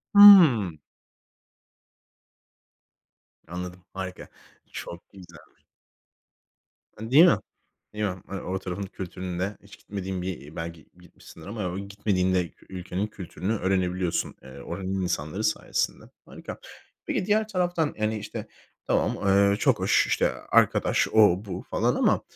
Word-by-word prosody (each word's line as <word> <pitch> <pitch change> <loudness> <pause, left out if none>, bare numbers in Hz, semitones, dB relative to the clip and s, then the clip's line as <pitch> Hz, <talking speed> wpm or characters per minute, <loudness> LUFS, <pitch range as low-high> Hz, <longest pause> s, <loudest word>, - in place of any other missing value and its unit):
Hımm. 155 - +8 2.7
Anladım, 90 +1 -7
harika. 95 -1 -6 0.4
Çok 85 +3 -8
güzelmiş. 95 -3 -16 1.3
A, 110 +2 -7
değil 155 +6 +8
mi? 175 - +5 0.6
Değil 105 0 -2
mi? 95 -3 -3
Hani, 100 -1 -6
o 95 +1 -3
tarafın 95 +1 -5
kültüründe, 95 0 -5
hiç 100 - -15
gitmediğin 95 -2 -5
bir 80 -5 -6
belki 85 -1 -7
gitmişsindir 85 -2 -15
ama 95 -3 -4
gitmediğin 100 -2 -1
de 90 -3 0 0.2
ülkenin 95 +2 -4
kültürünü 100 -1 -5
öğrenebiliyorsun, 95 -2 -1
eee, 65 0 -12
oranın 95 +2 -4
insanları 90 +3 -2
sayesinde. 110 -1 -1 0.2
Harika. - - -9 0.5
Peki, - - -1
diğer 215 +1 +2
taraftan, 175 -6 0
yani, 110 0 0
işte, 105 +1 -7 0.4
tamam, - - +1
eee, 100 +1 +4
çok - - +2
hoş. - - +3
İşte, - - +1 0.2
arkadaş, - - +3
o, 105 -3 +5
bu 95 -3 -6
falan - - +1
ama - - +2
95 Hz, 120 wpm, -26 LUFS, 90-105 Hz, 2.7 s, Hımm